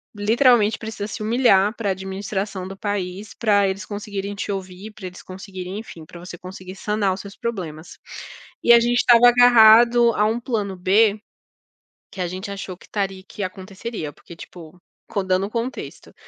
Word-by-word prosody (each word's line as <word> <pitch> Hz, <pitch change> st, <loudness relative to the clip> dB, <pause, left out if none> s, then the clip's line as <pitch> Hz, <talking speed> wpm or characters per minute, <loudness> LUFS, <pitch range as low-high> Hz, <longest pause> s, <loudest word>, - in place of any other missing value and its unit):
literalmente 225 Hz, +1 st, +3 dB
precisa 220 Hz, -2 st, -6 dB
se 215 Hz, -, -6 dB
humilhar 215 Hz, -3 st, +3 dB
para 210 Hz, -3 st, -2 dB
a -, -, +2 dB
administração 190 Hz, 0 st, -5 dB
do 195 Hz, -, -8 dB
país 200 Hz, 0 st, -4 dB
para 205 Hz, -3 st, +2 dB
eles 190 Hz, 0 st, -5 dB
conseguirem 205 Hz, -1 st, -5 dB
te 205 Hz, -, -4 dB
ouvir, 190 Hz, +2 st, -7 dB
para 205 Hz, -3 st, -9 dB
eles 180 Hz, 0 st, -11 dB
conseguirem, 190 Hz, 0 st, -8 dB
enfim, 170 Hz, -7 st, -11 dB
para 170 Hz, -, -12 dB
você 175 Hz, 0 st, -9 dB
conseguir 185 Hz, +1 st, -10 dB
sanar 205 Hz, -1 st, -1 dB
os 190 Hz, -, -7 dB
seus 200 Hz, 0 st, -12 dB
problemas. 180 Hz, -9 st, -6 dB, 0.7 s
E 235 Hz, -, +7 dB
a 235 Hz, -, +8 dB
gente 240 Hz, +1 st, +1 dB
estava 240 Hz, -1 st, +6 dB
agarrado 240 Hz, 0 st, +6 dB
a 210 Hz, -, +2 dB
um 225 Hz, +2 st, 0 dB
plano 210 Hz, -6 st, -3 dB
B, 205 Hz, +3 st, +3 dB, 0.9 s
que 190 Hz, -, -8 dB
a -, -, -1 dB
gente 185 Hz, +3 st, -6 dB
achou 195 Hz, -2 st, -6 dB
que -, -, -18 dB
estaria 195 Hz, -2 st, -3 dB
que 205 Hz, -, -7 dB
aconteceria, 190 Hz, -2 st, -6 dB
porque, 170 Hz, -, -14 dB
tipo, 170 Hz, 0 st, -12 dB, 0.3 s
con 200 Hz, -2 st, -2 dB
dando 185 Hz, +1 st, +1 dB
o -, -, -10 dB
contexto, 235 Hz, +3 st, -6 dB
200 Hz, 175 wpm, -22 LUFS, 185-220 Hz, 0.9 s, a